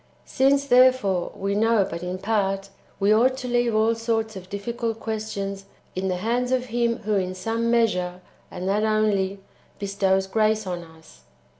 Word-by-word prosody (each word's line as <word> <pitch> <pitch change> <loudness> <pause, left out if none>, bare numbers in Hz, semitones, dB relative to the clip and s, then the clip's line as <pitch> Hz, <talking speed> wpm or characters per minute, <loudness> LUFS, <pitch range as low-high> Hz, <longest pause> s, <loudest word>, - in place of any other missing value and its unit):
"* - - -35
/ - - -35
Since, 275 +1 +2
therefore, 250 -8 +4
we 195 +1 -2
know 220 -1 +3
but 170 -3 -6
in 180 +1 -4
part, 195 -1 -1 0.3
we 200 +1 +4
ought 255 +4 +3
to 250 - -5
leave 240 -2 +1
all 220 +1 +3
sorts 225 -1 -2
of 185 -1 -9
[difficult] 225 +2 -3
questions 200 -3 -4 0.3
in 190 +1 -1
the 185 - 0
hands 240 +6 -1
of 255 -1 +1
Him 235 -1 0
who 215 +1 -1
in 185 -1 -2
some 225 +5 -1
measure, 180 -7 +1 0.3
[and 180 +1 -5
that 205 +2 +1
only,] 205 -3 +1 0.4
bestows 195 -1 +1
grace 215 +1 +1
on 175 -2 -4
us. 160 -1 -17
215 Hz, 175 wpm, -24 LUFS, 190-230 Hz, 0.4 s, therefore